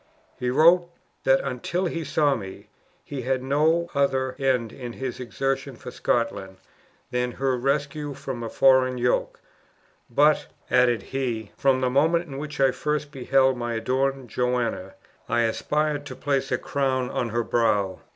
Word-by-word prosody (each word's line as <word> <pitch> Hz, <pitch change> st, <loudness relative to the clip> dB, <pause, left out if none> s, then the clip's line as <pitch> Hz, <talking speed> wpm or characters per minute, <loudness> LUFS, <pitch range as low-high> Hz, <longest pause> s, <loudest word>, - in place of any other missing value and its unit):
He 125 Hz, -, -1 dB
wrote, 170 Hz, +6 st, +5 dB, 0.4 s
that -, -, +4 dB
until 185 Hz, -, -2 dB
he 165 Hz, -1 st, -2 dB
saw 145 Hz, 0 st, +2 dB
me, 95 Hz, -7 st, -7 dB, 0.3 s
he 140 Hz, -2 st, -6 dB
had 130 Hz, +1 st, -1 dB
no 155 Hz, +5 st, +2 dB
other 135 Hz, -2 st, +1 dB
end 125 Hz, -5 st, +1 dB
in 120 Hz, -2 st, -7 dB
his 130 Hz, -1 st, -5 dB
exertions 135 Hz, +1 st, -3 dB
for -, -, -6 dB
Scotland 100 Hz, -5 st, -1 dB, 0.5 s
than 125 Hz, 0 st, -1 dB
her 135 Hz, -1 st, 0 dB
rescue 140 Hz, +2 st, -1 dB
from 130 Hz, -3 st, -6 dB
a 115 Hz, -, -4 dB
foreign 130 Hz, 0 st, +4 dB
yoke; 125 Hz, 0 st, 0 dB, 0.7 s
'but,' 145 Hz, +5 st, +3 dB, 0.2 s
added 120 Hz, -2 st, +3 dB
he, 120 Hz, -6 st, -3 dB
'from 135 Hz, -1 st, +2 dB
the 130 Hz, -, +2 dB
moment 165 Hz, +6 st, +3 dB
in 135 Hz, -2 st, -7 dB
which 150 Hz, 0 st, -6 dB
I 135 Hz, -1 st, +5 dB
first 150 Hz, +1 st, -2 dB
beheld 135 Hz, 0 st, +2 dB
my 120 Hz, -1 st, -3 dB
adored 130 Hz, +3 st, -1 dB
Joanna, 125 Hz, -6 st, -1 dB, 0.3 s
I 120 Hz, -, +2 dB
aspired 145 Hz, +5 st, 0 dB
to 130 Hz, -, -7 dB
place 135 Hz, -1 st, -1 dB
a -, -, +2 dB
crown 130 Hz, -2 st, -1 dB
on 120 Hz, -, -1 dB
her 120 Hz, +2 st, 0 dB
brow!" 105 Hz, -6 st, +1 dB
130 Hz, 155 wpm, -25 LUFS, 120-145 Hz, 0.7 s, wrote